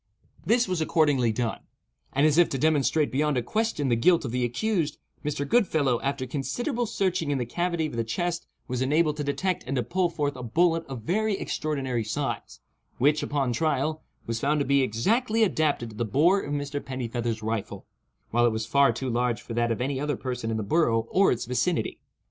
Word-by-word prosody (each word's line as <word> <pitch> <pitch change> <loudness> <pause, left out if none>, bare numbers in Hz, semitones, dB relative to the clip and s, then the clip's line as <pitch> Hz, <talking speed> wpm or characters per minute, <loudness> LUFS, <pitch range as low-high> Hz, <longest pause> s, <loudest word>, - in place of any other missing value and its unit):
This 240 0 +3
was 180 -3 -1
accordingly 145 -7 +2
done; 115 +1 -2 0.5
and, 140 +3 +2
as 155 +2 +4
if 175 - +5
to 135 - -2
demonstrate 150 +1 +2
beyond 145 +1 +1
a 120 - 0
question 215 - -1
the 120 - +3
guilt 165 +7 +3
of 120 - -3
the 125 +1 0
accused, 165 - -1 0.3
Mr. 145 -1 -2
Goodfellow, 155 - +2
after 140 -1 -2
considerable 240 - -2
searching 185 -7 0
in 145 - +1
the 125 - -1
cavity 170 +5 -1
of 150 - -5
the 115 - 0
chest 170 +9 -2 0.2
was 125 -2 -2
enabled 150 +3 +2
to 150 - -2
detect 180 +6 -1
and 135 - -2
to 125 - +1
pull 175 - 0
forth 145 -4 -2
a 125 - -7
bullet 165 +7 +1
of 130 -5 -7
very 210 - 0
extraordinary 135 -10 -2
size, 110 - -4 0.4
which, 150 +4 +3
upon 140 -4 -1
trial, 155 +2 0 0.2
was 115 0 -2
found 150 +4 +1
to 140 - 0
be 140 +1 +3
exactly 220 - +1
adapted 150 - 0
to - - -12
the 120 - -1
bore 155 - +3
of 145 - -6
Mr. 145 0 -3
Pennifeather's 120 -3 -3
rifle, 110 -1 -3 0.5
while 120 +1 +4
it - - +2
was 110 0 -2
far 140 +4 +4
too 130 - -4
large 120 -1 0
for 115 - -8
that 120 0 +1
of 115 - -2
any 135 +1 -1
other 145 -2 -1
person 125 -3 -4
in 110 - -1
the 110 - -2
borough 115 -3 +2
or 195 +1 +4
its 120 - -1
vicinity. 145 +8 -1
140 Hz, 205 wpm, -26 LUFS, 120-165 Hz, 0.5 s, if